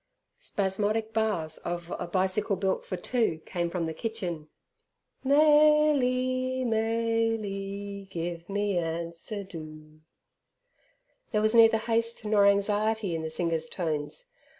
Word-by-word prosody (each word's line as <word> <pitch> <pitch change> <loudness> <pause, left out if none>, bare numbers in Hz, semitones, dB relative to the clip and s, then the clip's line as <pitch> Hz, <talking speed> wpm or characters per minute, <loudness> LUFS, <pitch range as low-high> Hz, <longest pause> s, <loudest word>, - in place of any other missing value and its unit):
Spasmodic 215 - -1
bars 210 -8 0
of 175 0 -5
"A - - -4
Bicycle 190 +3 +1
Built 190 0 -1
for 185 - -4
Two" 225 -2 0
came 175 -2 -2
from 170 -1 -2
the 160 - -3
kitchen, 175 -6 -4 0.7
"Mayly, 270 -3 +3
Mayly, 220 -3 -1
give 170 0 -5
me 200 -2 0
answer 170 +5 -4
do!" 155 -3 -11 1.3
There 210 - +1
was 215 +1 +3
neither 225 -1 +7
haste 230 0 -1
nor 210 -1 +4
anxiety 205 0 +1
in 165 - -2
the 160 - -4
singer's 160 -1 -2
tones. 160 - -3
200 Hz, 115 wpm, -28 LUFS, 170-225 Hz, 1.3 s, neither